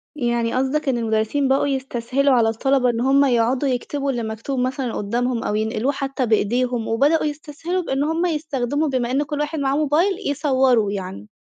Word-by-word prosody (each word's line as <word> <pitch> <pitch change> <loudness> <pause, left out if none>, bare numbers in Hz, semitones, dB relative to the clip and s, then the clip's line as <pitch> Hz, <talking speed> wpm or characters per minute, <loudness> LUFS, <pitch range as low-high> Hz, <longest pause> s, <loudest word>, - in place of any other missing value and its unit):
يعني 240 -4 -1
قصدَك 270 +3 0
إن 255 - +1
المدرِّسين 225 +4 0
بقوا 270 +2 +2
يستسهَلوا 265 0 0
على 230 -3 +4
الطلبة 255 +3 +1
إن 235 -1 -1
هُم 275 +2 +4
يقعدوا 250 +2 +1
يكتبوا 275 +2 -2
اللي 240 -3 -3
مكتوب 225 +5 -4
مثلًا 255 -1 -2
قُدَّامهم 235 +3 -1
أو 210 - -1
ينقلوه 220 +4 0
حتّى 275 -2 -2
بإيديهم، 235 +2 0
وبدؤوا 285 +8 +2
يستسهَلوا 305 +4 -3
بإن 270 -2 -1
هُم 325 +3 0
يستخدَموا، 300 -3 -1
بما 255 -3 -1
إن 275 +3 +1
كل 295 0 -4
واحد 300 +1 -2
معاه 275 -1 0
موبايل، 310 +6 +2
يصوّروا 260 -7 +2
يعني. 195 +1 -6
265 Hz, 175 wpm, -21 LUFS, 235-285 Hz, -, على